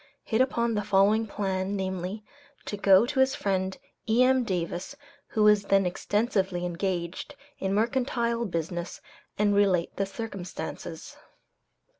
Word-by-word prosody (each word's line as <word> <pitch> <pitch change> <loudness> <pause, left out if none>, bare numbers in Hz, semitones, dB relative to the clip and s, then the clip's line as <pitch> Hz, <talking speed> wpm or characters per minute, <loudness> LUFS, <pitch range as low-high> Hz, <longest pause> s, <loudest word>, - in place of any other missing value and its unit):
hit 220 +1 +1
upon 235 -3 +1
the 210 - 0
following 205 +3 +3
plan, 195 -1 -2
namely, 190 +2 -3 0.4
to - - -4
go 200 +1 +5
to 265 +2 -2
his 265 0 +3
friend, 190 -1 -1 0.3
E.M. 255 +3 +4
Davis,[A] 180 +4 -3 0.3
who 215 - 0
was 210 -1 +5
then 195 -1 +3
extensively 190 -1 0
engaged 175 +7 -3 0.2
in 190 - -1
mercantile 235 +1 0
business, 170 0 -4 0.4
and 205 0 +3
relate 195 -4 +2
the 195 - 0
circumstances. 195 -4 -7
200 Hz, 125 wpm, -27 LUFS, 185-225 Hz, 0.4 s, go